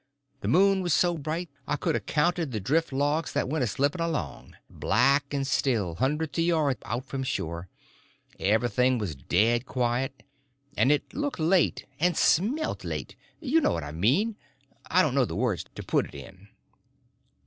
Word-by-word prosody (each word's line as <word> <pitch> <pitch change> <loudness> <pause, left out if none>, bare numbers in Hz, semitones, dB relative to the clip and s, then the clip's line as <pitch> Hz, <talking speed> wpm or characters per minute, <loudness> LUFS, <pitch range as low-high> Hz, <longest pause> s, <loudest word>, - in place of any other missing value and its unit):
The - - -5
moon 195 +2 +4
was 175 -4 +1
so 175 -1 +2
bright 160 +3 -3 0.2
I - - 0
could 145 - -1
a - - +1
counted 155 - 0
the 110 - -2
drift 155 - 0
logs 145 +4 0
that - - 0
went 150 0 0
a - - +1
slipping 140 - 0
along, 85 - -4
black 140 +7 +2
and 140 -1 -1
still, 115 -10 0
hundreds 150 - -1
of - - +3
yards 155 - +1
out 120 +3 -3
from 135 - -4
shore. 85 -8 -3 0.7
Everything 120 +5 +2
was 105 -8 -3
dead 115 - +1
quiet, 125 +2 -1 0.5
and 135 - +3
it 150 - 0
looked 290 -6 -3
late, 170 +2 +2
and 175 +1 +2
smelt 255 - +1
late. - - -5 0.2
You 320 +1 +2
know - - +2
what 85 - -3
I 75 - -6
mean—I 135 - -1
don't 150 - 0
know 135 -1 +3
the - - -3
words 110 -5 -1
to - - -6
put - - +1
it - - -15
in. 95 +1 -12
135 Hz, 170 wpm, -27 LUFS, 120-165 Hz, 0.7 s, moon